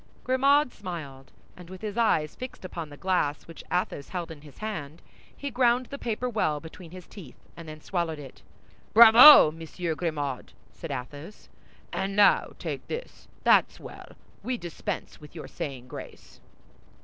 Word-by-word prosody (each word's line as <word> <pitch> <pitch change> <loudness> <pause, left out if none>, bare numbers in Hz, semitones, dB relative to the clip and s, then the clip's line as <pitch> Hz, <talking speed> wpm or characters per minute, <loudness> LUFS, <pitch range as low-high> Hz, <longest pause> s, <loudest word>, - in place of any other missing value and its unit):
Grimaud 275 +2 +3
smiled; 155 -9 -8 0.2
and 180 -1 -13
with 185 +2 -11
his 210 -1 -4
eyes 160 -10 +1
fixed 255 -6 -9
upon 165 -4 -6
the 145 - -12
glass 180 -6 -1
which 165 - -12
Athos 180 -5 -2
held 175 -3 -5
in 150 -3 -11
his 145 -3 -16
hand, 165 -8 -6 0.4
he 285 0 -5
ground 245 0 +2
the 280 - -6
paper 240 +1 -3
well 205 -11 -1
between 165 +2 -12
his 180 +1 -11
teeth 165 -12 -13 0.2
and 165 -2 -10
then 155 0 -10
swallowed 170 -3 -3
it. 140 -3 -12 0.5
"Bravo, 230 - +10
Monsieur 165 +1 -5
Grimaud!" 150 -6 -4 0.2
said - - -9
Athos; 145 +9 -8 0.4
"and 195 0 -3
now 205 0 +4
take - - -6
this. - - -8 0.2
That's - - +3
well. - - -12 0.3
We 250 0 -3
dispense 175 -5 -6
with 150 +2 -14
your 160 - -8
saying 130 -4 -7
grace." - - -11
175 Hz, 160 wpm, -27 LUFS, 150-220 Hz, 0.5 s, Bravo